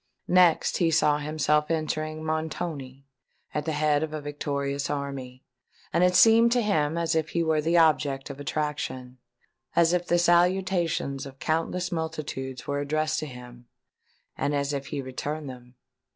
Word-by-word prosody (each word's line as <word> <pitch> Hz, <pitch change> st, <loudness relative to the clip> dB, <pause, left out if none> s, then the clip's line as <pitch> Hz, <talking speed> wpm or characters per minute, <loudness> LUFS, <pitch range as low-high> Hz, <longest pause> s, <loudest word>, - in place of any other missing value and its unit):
Next 180 Hz, -2 st, +4 dB
he 170 Hz, -, +2 dB
saw 150 Hz, -2 st, +3 dB
himself 150 Hz, 0 st, +1 dB
entering 155 Hz, -1 st, -2 dB
Montoni 155 Hz, -4 st, -4 dB, 0.5 s
at 150 Hz, -1 st, -2 dB
the 160 Hz, -, -1 dB
head 150 Hz, -1 st, +2 dB
of 155 Hz, -1 st, -3 dB
a 155 Hz, -, -3 dB
victorious 140 Hz, -1 st, -3 dB
army; 135 Hz, -3 st, -5 dB, 0.5 s
and 170 Hz, +2 st, +3 dB
it 180 Hz, 0 st, +3 dB
seemed 230 Hz, +2 st, +6 dB
to 245 Hz, -, +2 dB
him 160 Hz, -6 st, +1 dB
as 165 Hz, 0 st, 0 dB
if 160 Hz, 0 st, 0 dB
he 170 Hz, -, 0 dB
were 160 Hz, -1 st, +1 dB
the 165 Hz, +3 st, +2 dB
object 145 Hz, -4 st, +2 dB
of 140 Hz, -, -10 dB
attraction—as 130 Hz, +1 st, -3 dB
if 180 Hz, 0 st, 0 dB
the 175 Hz, -, +3 dB
salutations 175 Hz, -5 st, +1 dB
of 135 Hz, 0 st, -12 dB
countless 165 Hz, +4 st, -1 dB
multitudes 155 Hz, -6 st, -4 dB
were 145 Hz, 0 st, -2 dB
addressed 155 Hz, +2 st, 0 dB
to 155 Hz, -, -4 dB
him—and 125 Hz, +3 st, -8 dB
as 140 Hz, 0 st, -1 dB
if 140 Hz, 0 st, -4 dB
he 140 Hz, -, -4 dB
returned 145 Hz, +4 st, -5 dB
them! 125 Hz, -1 st, -11 dB
150 Hz, 150 wpm, -26 LUFS, 140-165 Hz, 0.5 s, seemed